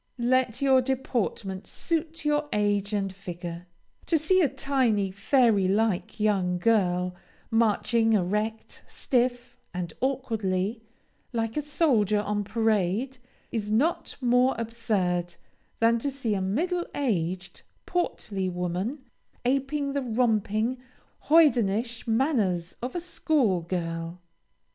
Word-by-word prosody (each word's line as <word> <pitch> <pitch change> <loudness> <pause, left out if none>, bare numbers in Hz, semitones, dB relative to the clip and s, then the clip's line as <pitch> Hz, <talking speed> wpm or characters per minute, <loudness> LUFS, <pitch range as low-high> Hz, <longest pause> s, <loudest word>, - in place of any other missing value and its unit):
Let 250 0 +1
your 265 -1 +5
deportment 235 -7 -2
suit 325 -2 -3
your 295 0 +1
age 205 -1 +1
and 195 -2 -1
figure; 175 -2 -7 0.4
to 330 - +3
see 370 +5 +3
a 300 - +3
tiny, 255 -8 +1
fairy 210 -1 +3
like 210 0 0
young 195 -4 +1
girl, 180 -3 +2 0.4
marching 225 0 +2
erect, 210 +3 -1
stiff, 245 -1 -1 0.2
and 175 -3 -4
awkwardly, 225 -6 -1 0.5
like 225 -1 -1
a 300 - 0
soldier 260 - +2
on 205 0 -1
parade, 220 +3 0 0.3
is 210 -3 -2
not 270 +11 +1
more 250 0 +3
absurd 200 -7 -1 0.4
than 230 +1 +4
to 280 - -1
see 260 -5 -2
a 195 - -1
middle 345 - -1
aged, 185 - -2 0.2
portly 205 - -2
woman, 180 - -3 0.4
aping 275 +2 0
the 280 - 0
romping, 225 -1 0 0.5
hoydenish 240 -8 +3
manners 220 - +1
of 250 +6 -4
a - - 0
school 300 - +1
girl. 165 0 -4
225 Hz, 115 wpm, -27 LUFS, 195-260 Hz, 0.5 s, your